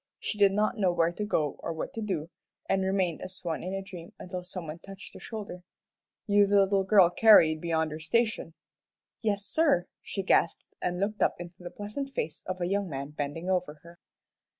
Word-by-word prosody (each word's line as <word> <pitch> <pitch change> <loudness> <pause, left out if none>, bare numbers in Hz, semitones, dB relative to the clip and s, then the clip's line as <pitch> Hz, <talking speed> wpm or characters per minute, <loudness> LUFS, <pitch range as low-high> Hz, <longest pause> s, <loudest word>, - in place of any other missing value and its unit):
She 210 - -4
did 200 -1 +6
not 215 +3 0
know 190 -3 +3
where 170 -1 +2
to 210 - -4
go 155 -9 0
or - - -4
what 160 - -5
to 225 - -4
do, 175 -6 -3 0.4
and 190 0 +1
remained 190 -3 0
as 185 - -6
one 165 -3 -2
in 185 +2 -4
a 195 - -3
dream 175 -3 -10
until 180 0 -6
some 180 -1 -6
one 155 +2 -7
touched 195 +2 -11
her - - -10
shoulder. 205 -5 -7 0.6
"You 205 -1 +4
the 200 0 +5
little 195 0 +2
girl 190 -3 +6
carried 165 -8 +6
beyond 160 -2 0
your 155 - -5
station?" 190 0 0 0.7
"Yes, 205 -2 0
sir," 290 - +2 0.2
she 195 - -4
gasped, 170 -3 +2 0.2
and 180 0 -1
looked 210 +2 -1
up - - +3
into 175 0 -9
the 175 - -6
pleasant 210 +9 -5
face 160 - -4
of 185 0 -3
a 175 - 0
young 195 +1 0
man 140 0 -5
bending 150 +3 -4
over 180 -5 0
her. 170 +1 -15
185 Hz, 205 wpm, -29 LUFS, 170-205 Hz, 0.7 s, did